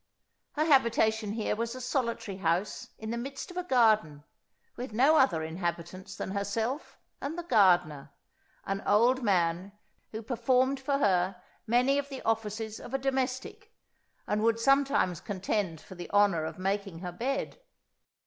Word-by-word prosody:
Her 305 +1 +1
habitation 220 -7 +3
here 220 -1 -1
was 230 +2 -3
a - - -6
solitary 235 -6 -2
house 180 +2 -1
in 220 0 -6
the 235 - -2
midst 275 +7 -6
of 360 - -10
a 360 - -1
garden, 215 - +2 0.5
with 245 -2 -6
no 270 +8 +5
other 170 - +3
inhabitants 175 +3 -5
than - - -5
herself 220 +8 -3 0.2
and 300 +4 -4
the 345 - -4
gardener, 175 - +3 0.6
an 195 0 -2
old 240 +6 +4
man, 185 -2 +1 0.4
who 220 +1 -6
performed 255 +3 +1
for 275 +1 0
her 185 -6 +1 0.3
many 250 +5 +3
of 280 0 -5
the 270 -2 -7
offices 220 -1 -2
of 260 - -6
a - - +3
domestic, 265 -1 -3 0.5
and 210 0 -1
would 230 +1 +2
sometimes 275 - +2
contend 190 -3 -2
for - - -13
the 175 -1 -8
honour 200 -6 +3
of - - -6
making 195 -2 -2
her 180 -1 -5
bed. 265 - -3
220 Hz, 155 wpm, -29 LUFS, 190-260 Hz, 0.6 s, no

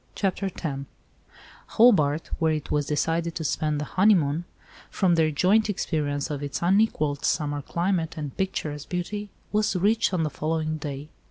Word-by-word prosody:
CHAPTER 195 0 -1
X 185 - -7 1.1
HOBART, 160 -10 +4
where 160 -2 +2
it 155 -2 -4
was 145 -2 +1
decided 165 +2 0
to 165 - -3
spend 150 0 0
the 150 - -3
honeymoon, 175 -4 +3 0.4
from 185 -3 +2
their 160 -2 +3
joint 195 +8 +3
experience 150 -7 -1
of 145 -1 -3
its 145 +3 -4
unequalled 170 -7 +2
summer 145 -1 0
climate, 170 +1 -1
and 150 -3 -5
picturesque 150 -6 -3
beauty, 205 +4 -3 0.2
was 210 -1 +1
reached 210 +5 +2
on 180 -3 0
the 155 - -1
following 155 0 -2
day. 145 0 -6
160 Hz, 155 wpm, -25 LUFS, 150-190 Hz, 1.1 s, HOBART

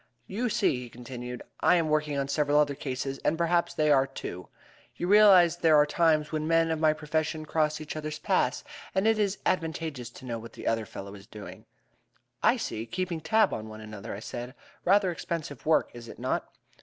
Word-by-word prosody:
You 235 +6 -2
see," 210 - +2
he 125 - -8
continued, 125 0 -8 0.2
"I 180 - +4
am 165 -2 +2
working 150 -1 0
on 140 -1 -1
several 145 +1 +1
other 145 -1 +3
cases, 135 0 -4
and 160 - 0
perhaps 170 +1 +1
they 150 -1 +3
are, 135 -1 +4
too. 90 -9 -7 0.5
You - - -3
realize 190 -4 +7
there 160 -3 +4
are 150 0 +6
times 155 0 +2
when 155 -1 -2
men 165 0 +3
of 160 - -1
my 155 -1 +4
profession 155 0 -2
cross 155 -1 0
each 155 0 -6
other's 155 0 -4
paths, - - 0 0.3
and 190 +2 +2
it 220 -1 +3
is 200 -1 +1
advantageous 160 -7 -2
to 125 - -13
know 115 -2 -4
what 115 +1 -11
the - - -10
other 115 -1 0
fellow 100 0 -8
is 100 0 -13
doing." 105 -1 -10 0.8
"I - - +4
see. 110 +1 -4
Keeping 180 -2 -3
tab 220 +4 +3
on 110 0 -5
one 110 0 -9
another!" 110 0 -7
I 100 - -8
said. 120 +3 -7 0.3
"Rather 195 0 +4
expensive 155 -6 -5
work, 160 - +3
is 120 -1 -10
it - - -10
not?" - - -2
150 Hz, 205 wpm, -28 LUFS, 125-170 Hz, 0.8 s, realize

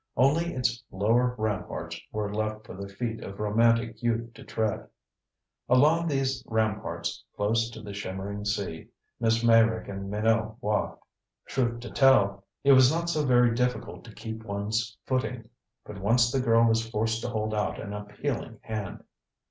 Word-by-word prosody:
Only 150 +7 +3
its 125 -1 0
lower 120 +5 +2
ramparts 110 -3 -3
were 105 -1 -3
left 110 0 -2
for - - -9
the 100 +1 -7
feet 115 +3 -4
of 100 0 -8
romantic 115 +1 +2
youth 115 -1 -1
to 115 - -12
tread. 110 -2 -2 0.8
Along 155 +7 +4
these 135 -3 0
ramparts, 105 -6 -1
close 115 +3 +1
to 115 -2 -10
the 100 -1 -7
shimmering 100 +1 -5
sea, 100 -6 -3 0.3
Miss 115 0 +2
Meyrick 115 -1 +4
and 100 0 -5
Minot 110 +1 +1
walked. 105 -4 -1 0.4
Truth 120 -2 -1
to 120 - -8
tell, 100 -8 +4 0.2
it 140 - +6
was 130 -1 +7
not 170 +1 0
so 155 -2 +1
very 125 -3 +4
difficult 125 -1 -2
to 110 - -12
keep 110 +1 -7
one's 110 +2 -2
footing 125 -3 -2 0.4
but 105 -1 -8
once 120 +4 +3
the 135 - +1
girl 115 -2 +4
was 115 0 +2
forced 115 +1 0
to - - -3
hold 110 -1 -2
out 105 -1 -1
an 105 -2 -6
appealing 105 +3 -4
hand. 110 -3 -5
115 Hz, 160 wpm, -28 LUFS, 105-120 Hz, 0.8 s, was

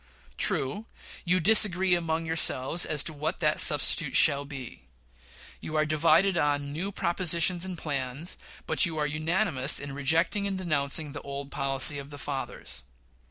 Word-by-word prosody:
True, 140 - +1 0.4
you 180 +1 +2
disagree 190 -1 +4
among 165 -1 -1
yourselves 160 -1 0
as 150 -2 0
to 160 - -5
what 150 +1 -3
that 155 -3 +1
substitute 150 0 +3
shall 140 -2 +4
be. 135 -4 -9 0.8
You 155 - -7
are 155 0 +2
divided 165 +4 +2
on 145 -1 -1
new 185 +6 -4
propositions 175 -1 0
and 185 -2 -6
plans, 140 +1 -4 0.3
but - - +2
you 165 -3 +1
are 150 - 0
unanimous 155 -1 0
in 140 -1 -8
rejecting 160 +8 0
and 195 -1 -3
denouncing 150 -4 -2
the 145 - -8
old 140 0 -8
policy 135 +1 +2
of 140 0 -10
the 145 - -10
fathers. 140 - -7
155 Hz, 155 wpm, -27 LUFS, 140-175 Hz, 0.8 s, disagree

